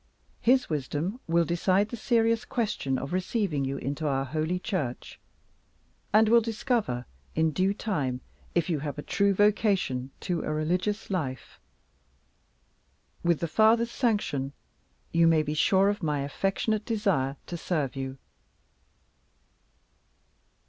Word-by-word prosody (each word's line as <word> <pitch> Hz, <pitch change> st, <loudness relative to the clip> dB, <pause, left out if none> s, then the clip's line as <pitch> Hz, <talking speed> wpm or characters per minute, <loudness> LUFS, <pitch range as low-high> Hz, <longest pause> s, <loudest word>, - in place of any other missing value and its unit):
His 255 Hz, +2 st, +4 dB
wisdom 155 Hz, -, -2 dB
will 170 Hz, 0 st, +3 dB
decide 185 Hz, +5 st, +2 dB
the 240 Hz, -, -4 dB
serious 230 Hz, 0 st, +2 dB
question 210 Hz, -, -1 dB
of 135 Hz, +5 st, -5 dB
receiving 185 Hz, -, 0 dB
you 135 Hz, +1 st, -2 dB
into 145 Hz, +3 st, -3 dB
our 135 Hz, -1 st, 0 dB
Holy 155 Hz, +5 st, -1 dB
Church, 175 Hz, -, -4 dB, 0.9 s
and 215 Hz, +1 st, +5 dB
will 235 Hz, +2 st, +6 dB
discover, 220 Hz, -, -1 dB, 0.3 s
in 160 Hz, 0 st, +2 dB
due 185 Hz, +5 st, +2 dB
time, 145 Hz, -, -2 dB, 0.3 s
if 170 Hz, -2 st, +2 dB
you 160 Hz, -4 st, 0 dB
have 145 Hz, 0 st, -4 dB
a 145 Hz, -, -5 dB
true 200 Hz, 0 st, +2 dB
vocation 195 Hz, -, +2 dB
to 175 Hz, -3 st, -1 dB
a -, -, -3 dB
religious 180 Hz, +8 st, -1 dB
life. 140 Hz, -9 st, -4 dB, 1.6 s
With 170 Hz, -2 st, +2 dB
the 170 Hz, -, 0 dB
Father's 225 Hz, +6 st, +4 dB
sanction, 175 Hz, -, 0 dB, 0.6 s
you 170 Hz, 0 st, +4 dB
may 160 Hz, -2 st, +4 dB
be 150 Hz, 0 st, -2 dB
sure 190 Hz, +5 st, +4 dB
of 205 Hz, 0 st, -2 dB
my 150 Hz, -4 st, 0 dB
affectionate 195 Hz, +8 st, -1 dB
desire 190 Hz, -, 0 dB
to 175 Hz, -, -6 dB
serve 155 Hz, -5 st, -2 dB
you." 135 Hz, 0 st, -4 dB
175 Hz, 130 wpm, -28 LUFS, 145-210 Hz, 1.6 s, will